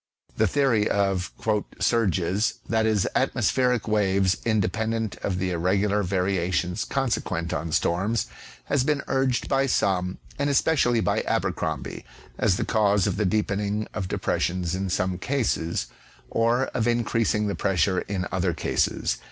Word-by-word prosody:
The 110 - +3
theory 120 -3 +2
of 95 -2 0 0.2
" 105 - -6
surges," 100 -3 +1
that 110 -1 +1
is, 105 -4 +2
atmospheric 125 -3 +1
waves 100 -3 +2
independent 110 +1 0
of 95 -3 -2
the 95 0 -1
irregular 100 +4 +1
variations 90 -1 0
consequent 100 -10 -1
on 80 -1 -3
storms, 95 +9 +1 0.4
has 140 -3 +1
been 145 0 0
urged 130 -2 +1
by 135 0 +2
some, 90 -6 0 0.2
and 140 0 +1
especially 135 -5 +3
by - - +1
Abercromby, - - -2 0.4
as 95 -4 +2
the - - -1
cause 105 -3 +2
of - - -1
the 105 - +1
deepen 100 +1 0
ing 105 +1 -2
of 95 -3 -3
depressions 90 -1 -1
in 95 +1 -2
some 90 0 -1
cases 105 - -1 0.5
or 115 +3 +2
of 115 -2 0
increasing 115 -2 +1
the 100 - -1
pressure 95 -1 +1
in 95 -2 -3
other - - 0
cases. - - 0
105 Hz, 145 wpm, -25 LUFS, 95-115 Hz, 0.5 s, The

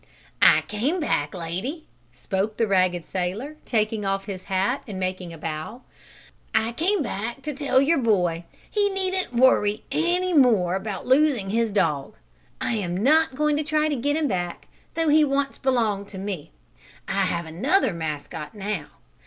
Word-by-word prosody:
"I - - +7
came 260 - -1
back, 145 - -1
lady," 185 - -4 0.2
spoke 190 - -3
the 230 - +2
ragged 185 -4 +2
sailor, 200 +12 -3
taking 215 -2 0
off 195 0 -1
his 190 -3 -7
hat 195 +7 0
and 195 -4 -5
making 185 -1 -3
a 165 - -9
bow, 160 +10 -6 0.7
"I 220 +1 +2
came 345 - +1
back 235 +3 -4
to 300 - -3
tell 275 -2 +2
your 280 +3 +3
boy 180 -8 +1 0.3
he 410 -1 +2
needn't 375 -5 -1
worry 225 -4 +3
any 355 +2 +1
more 225 - +4
about 195 +1 -4
losing 260 -7 +3
his 230 0 +1
dog. 150 -8 0 0.4
I - - -1
am 185 -1 -2
not 310 +1 +4
going 300 +1 +2
to 305 - 0
try 310 0 +1
to 295 - 0
get 290 +4 0
him 315 -2 +1
back, 175 -5 -3 0.3
though 325 -1 +1
he 305 +1 +6
once 275 -1 0
belonged 225 -7 0
to 195 - -9
me. 190 -5 -5 0.6
I 195 0 +1
have 170 -2 -2
another 235 - +1
mascot 155 0 -5
now. 200 -6 -3
215 Hz, 165 wpm, -24 LUFS, 185-285 Hz, 0.7 s, I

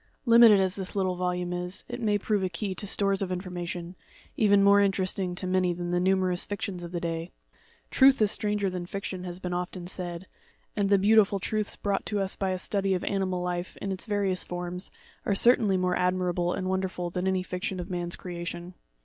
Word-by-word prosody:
Limited 230 -3 +7
as 190 0 0
this 190 -1 -6
little 185 -2 0
volume 180 0 -2
is, 180 +2 -4
it 245 0 -6
may 210 -2 +2
prove 205 0 0
a 185 - -1
key 190 +2 -3
to 205 - -6
stores 195 0 +4
of 190 -2 -2
information, 180 -1 -5 0.4
even 205 -2 +4
more 200 0 +6
interesting 190 -2 0
to 185 - -3
many 185 -1 +1
than 175 0 -4
the 175 - +1
numerous 185 -1 +2
fictions 200 -3 -5
of 170 -1 -7
the 175 - -2
day. 165 0 -3 0.3
' - - -33
Truth 270 0 +6
is 210 -2 +3
stranger 210 -2 0
than 180 -2 -4
fiction," 190 -1 -5
has 175 -1 -6
been 180 -1 -4
often 180 0 -4
said; 175 -1 -3 0.5
and 200 -2 +1
the 200 - +5
beautiful 205 0 +4
truths 215 +2 -2
brought 200 -1 -1
to 210 - -1
us 195 -1 0
by 195 - -1
a 185 - -1
study 195 +1 0
of 180 - -3
animal 185 -2 -1
life, 180 0 -4
in 195 - -4
its 190 +4 -5
various 200 -3 0
forms, 180 +1 -5 0.3
are 200 - 0
certainly 210 -3 +4
more 180 0 +1
admirable 180 -1 0
and 185 0 -3
wonderful 185 -2 -2
than 180 +2 -2
any 190 -1 +1
fiction 185 +1 -4
of 180 +2 -6
man's 175 -1 -1
creation. 175 0 -7
185 Hz, 210 wpm, -27 LUFS, 180-200 Hz, 0.5 s, Limited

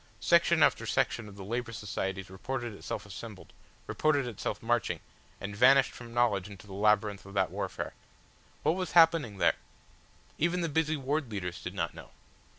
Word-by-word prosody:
Section - - +4
after - - +3
section 115 -3 0
of 100 - -11
the 100 - -8
Labour 120 +4 -3
Societies 95 -3 -4
reported 120 +4 -4
itself 100 0 -5
assembled, 105 0 -9 0.3
reported 145 -3 +1
itself 120 -5 -4
marching, - - +1 0.4
and 100 +1 -5
vanished 135 +4 +6
from 120 -1 -11
knowledge 110 -5 +1
into 100 -1 -11
the 100 - -10
labyrinth 105 0 +2
of 100 +1 -12
that 95 -3 +2
warfare. 95 0 -4 0.7
What 155 - +4
was 185 -1 -3
happening 165 - +5
there? - - +3 0.8
Even 170 +3 +1
the 165 - 0
busy 155 +1 +1
ward 140 0 -1
leaders 90 -5 -4
did - - -6
not - - -2
know. - - -11
110 Hz, 165 wpm, -30 LUFS, 100-135 Hz, 0.8 s, vanished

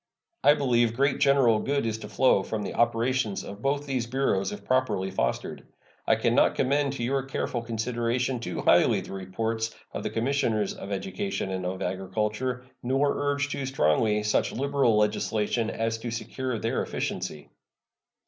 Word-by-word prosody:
I 145 - +7
believe 120 -5 +2
great 140 +2 +2
general 130 -6 +4
good 140 0 0
is 110 -1 -2
to - - -8
flow 130 -6 +4
from 105 +2 -3
the - - -4
operations 120 -2 +1
of 100 +2 -9
both 140 +2 0
these 130 -4 -2
Bureaus 115 -7 0
if 105 - -8
properly 130 -7 +1
fostered. 60 -10 -2 0.4
I - - +5
can - - +1
not - - +4
commend 140 +1 +1
to 130 - -4
your 135 +3 +1
careful 130 -2 -3
consideration 120 +2 -1
too 120 - -4
highly - - +4
the - - -9
reports 110 +4 -3 0.2
of - - -3
the - - -2
Commissioners 115 -4 0
of 100 - -8
Education 195 - -3
and 95 -1 -2
of 95 +1 -3
Agriculture, 105 +7 -2 0.2
nor 135 +3 +1
urge 140 0 0
too 140 -2 -3
strongly 105 - +2
such 105 - +1
liberal 135 -4 +2
legislation 105 +1 +1
as 115 0 -2
to 120 - -4
secure 120 +2 -3
their 115 +2 -1
efficiency. 75 - -4
115 Hz, 165 wpm, -27 LUFS, 105-135 Hz, 0.4 s, I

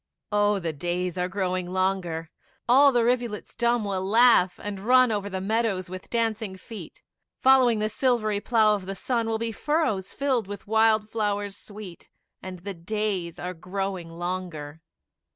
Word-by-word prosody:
Oh, 205 0 +3
the 170 -4 -3
days 175 +3 -2
are 180 - +1
growing 185 -2 -2
longer, 185 -4 -1 0.4
All 275 +4 +7
the 240 -2 +2
rivulets 240 -3 -1
dumb 235 -2 +1
will 190 -2 -2
laugh, 220 -2 +4
and 205 -1 -4
run 250 +3 +5
Over 205 -1 -2
the 190 -1 -3
meadows 195 -2 -1
with 185 0 -8
dancing 220 -4 -1
feet; 190 -3 -11 0.4
Following 255 -3 +5
the 215 0 0
silvery 215 -2 +1
plough 220 -1 +3
of 195 -3 -4
the 195 - -4
sun, 230 +2 -1
Will 225 - 0
be 230 0 -2
furrows 220 - -1
filled 260 -6 0
with 205 0 -7
wild 220 0 +3
flowers 205 -2 -1
sweet: 205 -5 -11 0.3
And 185 -1 -7
the 200 0 -4
days 185 -1 -3
are 180 +1 -4
growing 185 0 -4
longer. 165 -3 -5
205 Hz, 160 wpm, -26 LUFS, 185-225 Hz, 0.4 s, All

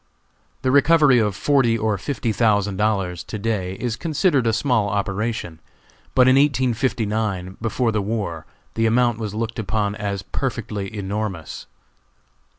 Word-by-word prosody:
The 130 - +2
recovery 145 -2 +5
of 105 -3 0
forty 130 -4 +2
or 110 -1 0
fifty 125 0 -2
thousand 105 -3 +1
dollars, 95 -5 0
to 105 - -5
day, 100 -4 -2
is 120 +2 -3
considered 150 -3 +1
a - - +3
small 110 -3 +1
operation; 100 -3 -2 0.6
but 125 0 +6
in 130 +1 +6
1859, 110 -8 0
before 115 +1 0
the 110 -1 0
war, 100 -7 -3 0.3
the 115 0 +1
amount 120 0 +2
was 105 -2 -4
looked 115 +1 -3
upon 105 -1 -1
as 100 -2 -4
perfectly 105 -6 -4
enormous. 100 -4 -4
110 Hz, 140 wpm, -22 LUFS, 100-125 Hz, 0.6 s, but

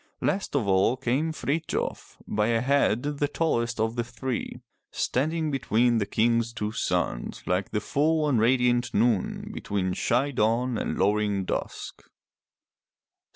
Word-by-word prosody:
Last 195 -6 -1
of 125 -8 +1
all 95 +6 +3
came 135 +6 0
Frithjof, 155 +1 -3
by 105 0 +1
a 115 -1 +2
head 130 -3 +2
the 145 0 -1
tallest 120 -7 -1
of 110 +1 0
the 120 - 0
three, 120 +1 -4 0.3
standing 155 +4 -1
between 120 -3 +2
the 100 - -1
King's 115 +1 +1
two 105 -2 -3
sons - - -2
like 90 +2 0
the 105 - -1
full 150 +8 +1
and 130 -6 +2
radiant 120 +1 +2
noon 110 -2 +1
between 95 -2 -2
shy 125 +9 +1
dawn 120 +1 +1
and - - -2
lowering 105 -1 +1
dusk. - - -4
120 Hz, 140 wpm, -26 LUFS, 105-140 Hz, 0.3 s, all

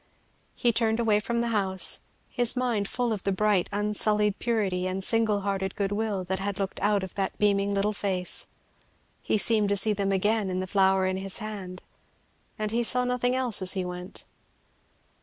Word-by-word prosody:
He 240 - +2
turned 225 0 +1
away 220 -3 +3
from 235 +2 -2
the 235 - -1
house, 190 -4 +1 0.3
his 245 -1 +1
mind 240 -5 0
full 245 0 -1
of 205 - -4
the 195 - 0
bright 200 -1 +1
unsullied 210 0 +1
purity 195 -6 -1
and 190 +1 -2
single 220 -1 +2
hearted 195 -1 -2
good 200 -1 -1
will 205 -2 -1
that 190 +1 -3
had 200 0 -3
looked 195 -2 -3
out 205 -1 +1
of 190 - -6
that 195 -1 -3
beaming 200 -1 +1
little 205 +2 0
face; 190 -3 -2 0.7
he - - 0
seemed 215 -1 +2
to 200 - +2
see 210 +2 +2
them 200 -1 -1
again 205 +1 +1
in 185 0 -2
the 185 - -2
flower 190 0 +2
held 185 0 -1
in - - -5
his 195 -1 0
hand, 200 -4 -7 0.7
and 215 -1 -3
he 235 +1 +1
saw 250 +2 +3
nothing 250 0 0
else 250 -6 +3
as 185 -1 +5
he 190 -2 -2
went. 180 +1 -7
205 Hz, 195 wpm, -27 LUFS, 190-220 Hz, 0.7 s, as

